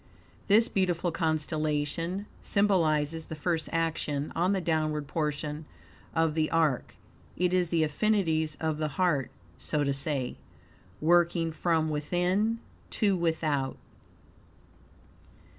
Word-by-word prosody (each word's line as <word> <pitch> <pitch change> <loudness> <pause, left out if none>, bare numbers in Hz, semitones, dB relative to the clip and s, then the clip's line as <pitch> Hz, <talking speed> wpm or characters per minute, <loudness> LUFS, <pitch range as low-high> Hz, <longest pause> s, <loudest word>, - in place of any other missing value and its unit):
This 220 +3 +5
beautiful 180 -2 0
constellation 155 +3 -1 0.2
symbolizes 160 -6 +1
the 160 - -5
first 160 +1 -1
action 160 -3 -1
on 180 +3 +2
the 195 - +1
downward 155 -3 0
portion 150 0 -2 0.5
of 165 -1 +2
the 155 0 +1
are. 160 -6 +2 0.6
It 180 +1 +1
is 180 -2 +2
the 165 -2 +2
affinities 160 -2 +1
of 160 -1 -1
the 155 - 0
heart, 170 -9 +2 0.3
so 150 -1 0
to 140 -1 +1
say, 135 -2 -2 0.6
working 170 0 +3
from 160 -1 +1
within 180 +9 +1 0.3
to 200 -3 +2
without. 155 -6 0
160 Hz, 110 wpm, -29 LUFS, 150-175 Hz, 0.6 s, This